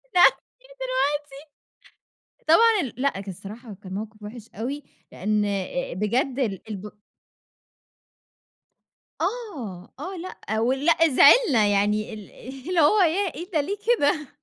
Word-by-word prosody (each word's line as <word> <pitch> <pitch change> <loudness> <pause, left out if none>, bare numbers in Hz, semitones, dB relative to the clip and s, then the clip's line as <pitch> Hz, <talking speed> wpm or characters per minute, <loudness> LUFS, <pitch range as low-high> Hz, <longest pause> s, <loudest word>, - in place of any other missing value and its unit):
نعمل 355 - +7 0.2
إيه - - -20
دلوقتي؟ 300 - -3 1.0
طبعًا 440 +5 +6
ال 255 - -5
لأ 280 - +3
كان 195 0 -7
الصراحة 210 +5 -10
كان 185 -1 -8
موقف 215 +1 -7
وحش 220 +2 -9
أوي 265 +7 -4 0.3
لأن 210 +2 0
آآ، 200 +5 -3
بجد 240 +7 -1
ال 215 -6 -2
الب 210 0 -6 2.3
آه، 320 - -4
آه 370 +7 -6
لأ، 330 - -5
ولأ 270 +7 +2
زِعلنا 270 - +6
يعني 210 +2 +1
ال 210 -2 -11 0.4
اللي 360 -2 +2
هو 320 +8 +5
ياه! 360 +3 +1
إيه 345 +6 -8
ده 315 -5 +1
ليه 390 +8 -2
كده 305 - +2
265 Hz, 130 wpm, -24 LUFS, 210-340 Hz, 2.3 s, نعمل